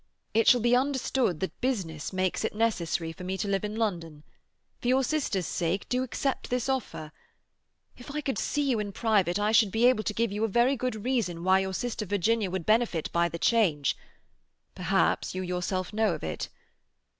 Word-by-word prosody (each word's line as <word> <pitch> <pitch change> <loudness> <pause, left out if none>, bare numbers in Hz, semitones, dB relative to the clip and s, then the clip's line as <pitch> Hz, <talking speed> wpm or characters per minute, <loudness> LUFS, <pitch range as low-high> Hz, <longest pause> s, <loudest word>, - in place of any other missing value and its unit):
It 225 +1 +3
shall 245 -2 +6
be 240 +2 +4
understood 260 - 0
that 190 - -4
business 185 - -2
makes 185 +1 -1
it 220 - -2
necessary 175 -7 0
for 170 - -10
me 190 +1 -3
to 205 - -2
live 195 -1 0
in 210 0 -3
London. 170 -9 -3 0.6
For - - -4
your 260 +2 +3
sister's 255 - -1
sake 175 +4 -2
do 250 0 +1
accept 260 +1 -2
this 250 0 -1
offer. 235 - -3 0.8
If 245 - -12
I 295 +2 -3
could 270 -8 -2
see 290 - 0
you 260 -5 +1
in 205 -1 -4
private, 205 -6 +2
I 210 +1 +1
should 220 -2 +5
be 225 +3 +2
able 245 -4 +4
to 210 - -1
give 230 -2 +1
you 210 +2 -2
a - - +3
very 240 +6 +3
good 240 -4 -3
reason 200 -10 -1
why 190 +1 +4
your 190 0 -2
sister 230 -2 -3
Virginia 205 +2 +1
would 180 -2 -3
benefit 215 -7 +1
by 170 0 +2
the 170 - -5
change; 170 - +2 0.8
perhaps - - 0
you 185 - -2
yourself 180 +1 -2
know 215 -5 +2
of - - -10
it. 80 - -4
210 Hz, 195 wpm, -28 LUFS, 180-240 Hz, 0.8 s, shall